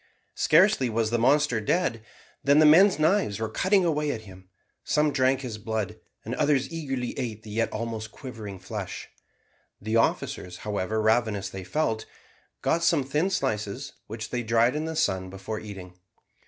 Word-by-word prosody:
Scarcely 130 -2 +4
was 110 0 0
the 120 - +1
monster 135 -1 +3
dead 120 -3 0 0.4
than 140 +1 +4
the 155 - +7
men's 180 +6 +7
knives 155 - +2
were 110 -1 -2
cutting 190 - +2
away 150 -2 0
at 110 - -4
him. 95 -3 -14 0.3
Some 150 0 +2
drank 130 0 +2
his 115 -5 -6
blood, 110 -1 -3 0.3
and 115 - -4
others 140 +2 +1
eagerly 135 -6 -3
ate 110 -4 -4
the 105 - -10
yet 115 +2 0
almost 110 -1 -4
quivering 110 -7 -8
flesh. 95 +1 -6 0.7
The 110 +3 0
officers, 90 -5 0
however 105 +1 -1
ravenous 110 -3 +1
they 95 -1 -6
felt, 110 +2 -1 0.6
got 170 - +1
some 165 -4 +3
thin 150 +8 0
slices, 105 - -2
which 110 +1 -6
they 125 - -1
dried 115 +3 +2
in 155 +1 -2
the 160 0 -4
sun 95 -12 0
before 95 +3 -5
eating. 95 -4 -9
115 Hz, 165 wpm, -26 LUFS, 105-145 Hz, 0.7 s, the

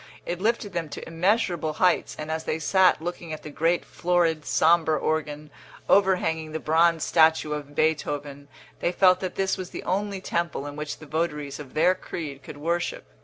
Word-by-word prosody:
It 175 +1 -4
lifted 215 -2 0
them 165 -3 -3
to - - -8
immeasurable 170 -2 0
heights; 180 +2 +1
and 155 +1 -5
as 160 0 -3
they 155 - -1
sat 185 +1 +3
looking 170 -2 -5
at 155 - -8
the 150 - -8
great 165 +4 +1
florid, 170 -3 0
sombre 160 -1 +3
organ, 150 -1 -2 0.4
overhanging 160 -5 +2
the 160 - -2
bronze 165 +1 +3
statue 160 -2 +3
of 145 -1 -6
Beethoven, 145 -2 -1 0.3
they 175 - 0
felt 185 0 +4
that 185 -1 -4
this 190 0 0
was 185 -1 -5
the - - -7
only 200 +1 -1
temple 170 -5 -2
in 145 0 -7
which 150 0 -5
the 155 - -12
votaries 150 -2 -3
of 140 -3 -10
their 170 +4 +4
creed 150 -6 -7
could - - -10
worship. 170 - -2
160 Hz, 180 wpm, -25 LUFS, 150-180 Hz, 0.4 s, felt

